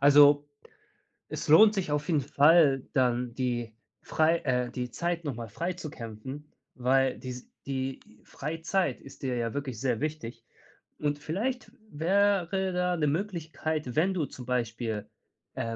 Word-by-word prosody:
Also, 145 +1 +7 0.8
es - - -5
lohnt 210 +7 +8
sich 180 -6 -1
auf 150 +1 -1
jeden 155 -5 +2
Fall 145 0 +4
dann 125 -2 +1
die 120 -3 -2 0.3
frei 160 +2 +2
äh, 125 -2 0
die 125 -1 -4
Zeit 170 +5 -2
noch 140 -5 -3
mal 115 -2 -6
frei 170 - -3
zu 160 -4 -7
kämpfen, 130 +6 -8 0.2
weil 130 +1 +2
dies 125 -1 -7 0.2
die 135 -1 -2 0.2
Freizeit 165 +1 -2
ist 135 - -14
dir 130 -2 -1
ja 115 -1 -2
wirklich 135 -6 -4
sehr 125 -4 0
wichtig 120 -7 -4 0.6
und 145 -1 0
vielleicht 220 - -3 0.2
wäre 190 +2 +1
da 180 0 +1
'ne 150 - +1
Möglichkeit, 160 - -2
wenn 180 +5 +3
du 170 -5 0
zum 125 - -10
Beispiel, 115 -3 -2 0.5
äh, 115 0 -3
145 Hz, 150 wpm, -29 LUFS, 125-165 Hz, 0.8 s, lohnt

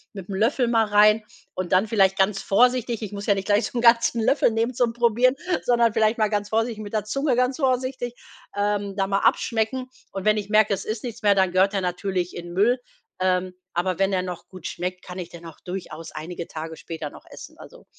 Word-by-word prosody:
mit'm 195 0 -6
Löffel 230 +4 +2
mal 225 -2 +3
rein 210 +1 +5 0.3
und 185 -1 -3
dann 185 +4 +4
vielleicht 195 -3 +3
ganz 195 0 +2
vorsichtig. 240 +1 +2
Ich 205 - -5
muss 200 0 -6
ja 200 - +4
nicht 195 - -4
gleich 205 +2 +2
so 255 - -6
'n - - +1
ganzen 235 0 +4
Löffel 255 +4 +3
nehmen 225 +2 -1
zum 240 -2 +1
Probieren, 240 +2 +3 0.3
sondern 235 -2 +3
vielleicht 220 0 +2
mal 215 -1 +2
ganz 205 -1 -1
vorsichtig 225 0 -1
mit 205 - -9
der 215 -2 0
Zunge 275 +4 0
ganz 250 +1 +1
vorsichtig, 255 -3 -1 0.4
ähm, 205 -1 -1
da 195 -1 +1
mal 195 0 0
abschmecken. 235 +5 0 0.2
Und 195 -1 -6
wenn 215 0 +4
ich 205 -1 -4
merke: 215 -1 +4
Es 195 - -4
ist 215 +2 -4
nichts 235 -2 -6
mehr, 205 -2 +4
dann 190 -2 +2
gehört 190 +3 +3
der 195 - 0
natürlich 180 0 -2
in 175 0 -7
'n 175 - -8
Müll. 225 +7 +3 0.4
Ähm, 185 0 0 0.2
aber 180 +1 -1
wenn 195 0 +2
er 185 -1 +1
noch 180 -2 -7
gut 185 -3 -12
schmeckt, 180 +1 -4
kann 180 0 -8
ich 175 -2 -6
den 170 -1 -12
auch 165 -2 -11
durchaus 180 -3 -7
einige 170 +2 -6
Tage 160 -1 -7
später 160 -3 -6
noch - - -14
essen, - - -12
also. - - -14
205 Hz, 225 wpm, -24 LUFS, 185-230 Hz, 0.4 s, rein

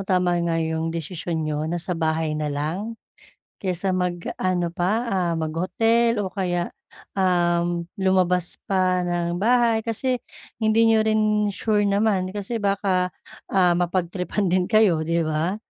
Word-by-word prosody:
tama 180 -1 +2
nga 170 -1 0
'yong 160 0 -1
desisyon 165 0 -3
niyo 155 0 -2
nasa 175 +2 -2
bahay 160 -1 0
na 150 0 -2
lang, 165 +11 -3 0.7
kaysa 185 0 0
mag-ano 180 0 -1
pa, 215 +7 0
ah, 185 -5 0
mag-hotel 225 +9 +1
o 200 - -1
kaya, 180 -2 -2 0.5
um, 175 -2 +1
lumabas 185 -2 +1
pa 185 -2 +2
ng 175 0 -1
bahay 235 +1 +3
kasi 240 +3 -1 0.4
hindi 220 0 +3
n'yo 225 -1 +4
rin 215 -1 +2
sure 205 +1 +1
naman 200 -2 +1
kasi 205 +3 -3
baka, 195 -2 +1 0.4
ah, 185 -2 +3
mapag-tripan 180 +2 -1
din 180 0 +2
kayo, 215 -6 +4
'di 165 +1 0
ba? 155 +4 -1
180 Hz, 135 wpm, -23 LUFS, 170-205 Hz, 0.7 s, n'yo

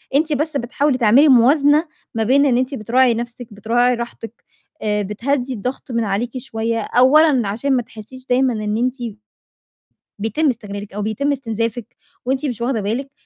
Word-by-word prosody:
أنتِ 310 +1 +2
بس 295 +1 -1
بتحاولي 265 +3 0
تعملي 250 +7 +5
موازنة 290 +5 +4 0.3
ما 225 - +1
بين 275 +5 +3
إن 245 -3 +3
أنتِ 260 +2 -1
بتراعي 245 +2 +2
نَفْسِك، 240 +1 -6
بتراعي 240 +4 +1
راحتِك، 235 -1 -8 0.4
آآ، 210 -1 0
بتهدّي 250 +6 -2
الضغط 250 +4 -5
من 230 -1 0
عليكِ 230 +6 -2
شوية 230 -2 -3
أولًا 260 +1 +4
عشان 265 +7 -1
ما - - +1
تحسّيش 230 +4 -13
دايمًا 250 0 +2
إن 215 0 -2
أنتِ 250 +2 0 1.2
بيتم 225 +9 0
استغلالِك 205 -4 -6
أو 210 - -4
بيتم 220 +8 -1
استنزافِك 230 -3 -3 0.3
وأنتِ 265 +3 -1
مش 240 -3 -5
واخدة 235 -3 -1
بالِك، 245 +7 -3
245 Hz, 160 wpm, -19 LUFS, 225-270 Hz, 1.2 s, تعملي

